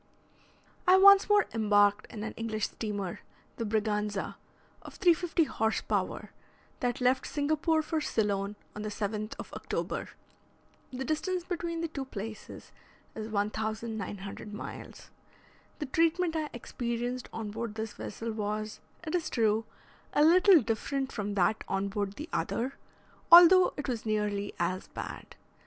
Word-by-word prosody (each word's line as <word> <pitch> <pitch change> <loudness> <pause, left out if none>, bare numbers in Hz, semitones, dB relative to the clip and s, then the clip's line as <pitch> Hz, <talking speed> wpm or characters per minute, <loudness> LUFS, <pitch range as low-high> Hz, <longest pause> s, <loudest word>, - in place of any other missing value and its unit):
I 370 +1 +8
once 400 +1 +8
more 415 0 +5
embarked 205 -1 +3
in 215 -3 -7
an 220 - -4
English 220 -2 -2
steamer, 205 -5 -4 0.4
the 230 - -2
"Braganza," 210 -2 -1 0.5
of - - -11
350 345 -2 +3
horse 220 -5 0
power, - - -2 0.5
that 250 +1 -1
left 255 +1 +2
Singapore 310 +2 +1
for 315 0 -1
Ceylon 205 -5 -1 0.2
on 210 - -5
the 215 - -3
7th 210 +1 -3
of - - -9
October. - - -3 0.8
The 260 +1 -4
distance 355 +4 -1
between 340 -2 -3
the 335 - -1
two 280 -4 -5
places 215 -3 -8 0.4
is 220 -1 -5
1,900 215 -1 -3
miles. - - -9 0.7
The 300 - -3
treatment 330 +4 +1
I 310 -2 -1
experienced 240 +1 -4
on 220 -2 -5
board 225 0 -4
this 220 -1 -4
vessel 225 +3 -5
was, 215 0 -3 0.3
it 310 - -4
is 350 -2 0
true, 220 -1 +1 0.5
a 295 - +4
little 355 0 +7
different 265 +5 -2
from 205 -2 -3
that 205 +3 +2
on 195 +1 -1
board 200 -1 -2
the 300 +8 -7
other, 255 +4 -1 0.6
although 355 +2 +9
it 290 - -4
was 235 -3 -3
nearly 205 -1 -1
as 185 +2 -1
bad. - - -8
225 Hz, 140 wpm, -30 LUFS, 210-310 Hz, 0.8 s, although